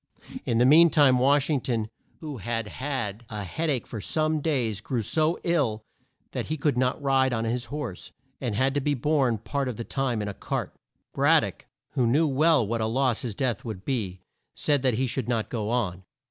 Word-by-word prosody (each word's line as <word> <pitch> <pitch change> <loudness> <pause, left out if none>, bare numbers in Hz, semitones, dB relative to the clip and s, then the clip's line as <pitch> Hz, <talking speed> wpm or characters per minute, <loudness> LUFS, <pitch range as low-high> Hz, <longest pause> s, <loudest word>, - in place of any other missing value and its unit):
In 115 - +2
the 120 - +5
mean 165 +5 +7
time 140 -5 +5
Wash 140 +2 +3
ing 145 -5 +1
ton, 115 -3 -2 0.3
who 150 -4 -6
had 115 +1 -3
had 120 -6 -4
a 105 -2 -4
head 160 - -2
ache 130 -5 0
for 110 - -6
some 155 +4 0
days, 120 -10 0
grew 120 -1 -2
so 155 - +1
ill 135 -11 +1 0.5
that - - -3
he 155 - -2
could 145 -2 +1
not 125 0 +1
ride 135 -2 +2
on 115 -1 -1
his 120 +2 -1
horse, 135 -9 -6 0.3
and 120 -5 -2
had 130 +4 +2
to 145 - 0
be 145 +1 +1
borne 135 -3 +1
part 140 +5 -3
of 125 -4 -4
the 115 - -4
time 130 -2 -1
in - - -4
a 100 - -4
cart. - - -4 0.4
Brad - - +4
dock - - -6 0.3
who 125 -3 +1 0.2
well 150 0 +4
knew - - -4
what 115 +1 -1
a 110 - +1
loss 125 0 +1
his 115 -6 -4
death 125 0 -1
would 110 -6 -7
be 100 -9 -2 0.3
said 145 -2 +1
that 130 -3 +2
he 130 +4 +1
should 125 0 -3
not 115 -3 0
go 110 -3 -3
on. 100 -7 -1
125 Hz, 215 wpm, -26 LUFS, 115-145 Hz, 0.5 s, mean